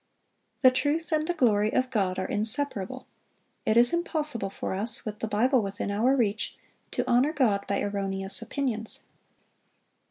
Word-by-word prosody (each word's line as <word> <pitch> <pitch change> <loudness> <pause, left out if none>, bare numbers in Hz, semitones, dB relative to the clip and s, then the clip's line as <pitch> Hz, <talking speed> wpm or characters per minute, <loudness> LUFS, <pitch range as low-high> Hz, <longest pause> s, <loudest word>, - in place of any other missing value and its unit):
The 255 - +8
truth 290 +6 0
and 310 0 +1
the 350 - +1
glory 215 -7 +3
of 255 0 0
God 195 -6 0
are 185 - -1
inseparable; 225 +2 -1 0.6
it 220 - +3
is 240 +4 +5
impossible 305 - -1
for - - -4
us, 210 +5 -3
with 210 -1 -5
the 225 - -2
Bible 245 +5 +3
within 200 0 -3
our 235 +7 +3
reach, 220 -4 -1 0.3
to - - -2
honor 250 +5 +3
God 220 -10 +1
by 200 - 0
erroneous 195 0 -2
opinions. 230 -2 -3
225 Hz, 155 wpm, -27 LUFS, 205-265 Hz, 0.6 s, The